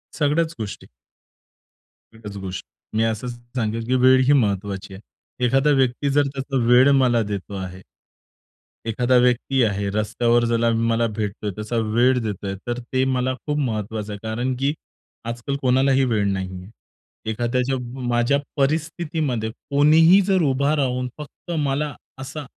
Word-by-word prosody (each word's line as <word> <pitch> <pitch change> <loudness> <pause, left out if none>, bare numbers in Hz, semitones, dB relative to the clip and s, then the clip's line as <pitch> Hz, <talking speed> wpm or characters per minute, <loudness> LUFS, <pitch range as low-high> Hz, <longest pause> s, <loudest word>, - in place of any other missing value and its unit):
सगळ्याच 160 +2 +1
गोष्टी. 105 -2 -6 1.3
एकच 105 -2 -9
गोष्ट. 95 -1 -6 0.3
मी 110 - +2
असं 115 +1 -1
सांगेन 120 -2 -4
की 130 +2 +1
वेळ 130 0 +6
ही 145 - +5
महत्त्वाची 100 -5 -1
आहे. 95 - -10 0.4
एखादा 135 +4 +3
व्यक्ती 130 +2 +1
जर 145 0 +2
त्याचा 135 0 -3
वेळ 125 +3 +6
मला 125 -4 +3
देतो 100 -1 -5
आहे. 95 0 -7 1.0
एखादा 120 +3 +1
व्यक्ती 125 +2 +2
आहे, 100 -2 0
रस्त्यावर 115 +3 +1
ज्याला 115 0 +2
मला 115 0 +1
भेटतोय, 105 -1 -3
त्याचा 110 +4 -5 0.2
वेळ 125 +2 +4
देतोय 100 -2 -4
तर 120 0 -2
ते 130 +2 -1
मला 130 0 0
खूप 150 0 -1
महत्त्वाचं 110 -5 -3
आहे. 105 - -7
कारण 120 +4 -2
की 140 +2 +1 0.5
आजकाल 120 +4 -3
कोणालाही 130 +1 +3
वेळ 110 -4 +1
नाही 95 -1 -3
आहे. 95 - -12 0.6
एखाद्याच्या 125 +4 0 0.3
माझ्या 120 +3 +2 0.2
परिस्थितीमध्ये 150 -4 -1
कोणीही 155 - +4
जर 190 -2 +3
उभा 140 +3 +1
राहून 125 -3 -1
फक्त 150 +3 -10
मला 140 +1 -1 0.3
असा 140 +2 -6
125 Hz, 140 wpm, -22 LUFS, 110-135 Hz, 1.3 s, वेळ